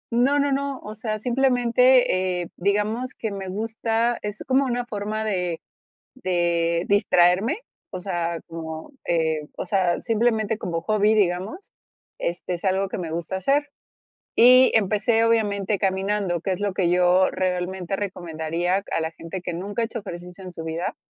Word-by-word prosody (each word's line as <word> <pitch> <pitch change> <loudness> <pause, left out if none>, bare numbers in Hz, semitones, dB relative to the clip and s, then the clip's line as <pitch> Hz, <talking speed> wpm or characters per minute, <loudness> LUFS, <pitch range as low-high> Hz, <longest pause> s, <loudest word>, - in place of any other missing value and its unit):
No, 265 +5 +3
no, 285 0 +2
no, 275 -1 -1
o 210 - -8
sea, 215 0 -3
eh, - - -6
simplemente 245 -7 +3
digamos 210 +6 0
que 220 - -3
me 195 -1 -5
gusta, 225 +3 -1
es 210 0 -5
como 265 +2 +3
una 245 -1 -1
forma 215 -1 -3
de 180 -6 -2 0.5
de 170 -5 0
distraerme, 200 - +3 0.3
o - - -5
sea, 175 -3 -2
como, 160 - -7
eh, 160 -2 +1 0.2
o - - -3
sea, 180 -2 +1
simplemente 220 -2 +1
como 170 -5 -3
hobby, 215 +1 +2
digamos 200 - -1 0.5
este, 175 +1 -3
es 170 - -11
algo 190 0 +1
que - - -4
me 170 -3 -4
gusta 170 +3 -3
hacer 275 +10 +1 0.7
y 255 +2 +7
empecé, 215 +2 +2
obviamente, 210 -3 +1
caminando, 190 -2 0
que 190 - -2
es 180 - -5
lo 205 -1 -1
que 185 -2 +1
yo 180 +1 +4
realmente 185 0 -2
recomendaría 175 -1 -2
a - - +1
la 160 0 -2
gente 165 +3 -7
que 175 - -3
nunca 200 +7 -3
ha - - +2
hecho 230 +1 -5
ejercicio 180 -1 -9
en 185 - -7
su 165 -2 -7
vida, 165 +2 -3
195 Hz, 160 wpm, -24 LUFS, 175-225 Hz, 0.7 s, y